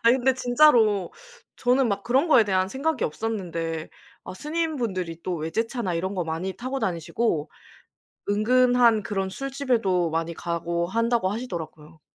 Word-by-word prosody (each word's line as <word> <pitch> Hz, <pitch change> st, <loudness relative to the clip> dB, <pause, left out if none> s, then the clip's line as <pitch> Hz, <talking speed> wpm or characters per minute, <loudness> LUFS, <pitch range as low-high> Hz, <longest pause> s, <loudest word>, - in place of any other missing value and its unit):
아니 235 Hz, +2 st, +5 dB
근데 260 Hz, 0 st, +2 dB
진짜로 245 Hz, -6 st, +4 dB, 0.4 s
저는 250 Hz, 0 st, +2 dB
막 200 Hz, -1 st, -1 dB
그런 265 Hz, +9 st, +2 dB
거에 235 Hz, -7 st, +6 dB
대한 190 Hz, -2 st, +1 dB
생각이 275 Hz, +4 st, -1 dB
없었는데 165 Hz, -4 st, -3 dB, 0.4 s
어 -, -, -7 dB
스님분들이 235 Hz, -, -3 dB
또 180 Hz, -2 st, -2 dB
외제차나 195 Hz, -, -2 dB
이런 190 Hz, +4 st, -2 dB
거 180 Hz, -3 st, -1 dB
많이 165 Hz, +4 st, -3 dB
타고 255 Hz, +6 st, -4 dB
다니시고 170 Hz, -3 st, -1 dB, 0.8 s
은근한 240 Hz, +1 st, +4 dB
그런 195 Hz, -2 st, -2 dB
술집에도 230 Hz, -, 0 dB
많이 165 Hz, +1 st, -2 dB
가고 170 Hz, 0 st, -2 dB
한다고 230 Hz, 0 st, +1 dB
하시더라고요. 165 Hz, -8 st, -7 dB
205 Hz, 330 characters per minute, -25 LUFS, 170-245 Hz, 0.8 s, 거에